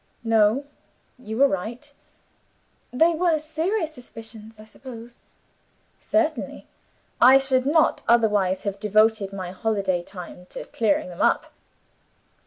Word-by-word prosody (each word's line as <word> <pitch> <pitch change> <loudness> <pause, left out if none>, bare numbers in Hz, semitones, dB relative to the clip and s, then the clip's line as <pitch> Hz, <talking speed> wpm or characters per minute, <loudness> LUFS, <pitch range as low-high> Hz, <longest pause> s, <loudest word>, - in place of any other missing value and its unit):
"No; 225 +4 +2 0.5
you 220 -3 -6
were 280 +2 +6
right." 240 +8 -5 1.0
"They 325 +7 +3
were 330 -1 +1
serious 320 +3 -2
suspicions, 225 -4 -12
I 215 - -12
suppose?" 235 +1 -12 0.8
"Certainly! 320 -1 -1 0.6
I 260 +2 +8
should 265 -1 +2
not 310 +2 +3
otherwise 210 -5 +2
have 200 -1 -4
devoted 215 -1 +2
my 185 -2 -6
holiday 195 -2 -1
time 180 0 -11
to - - -8
clearing 210 -5 0
them 175 - -7
up." - - +1
225 Hz, 115 wpm, -24 LUFS, 205-275 Hz, 1.0 s, I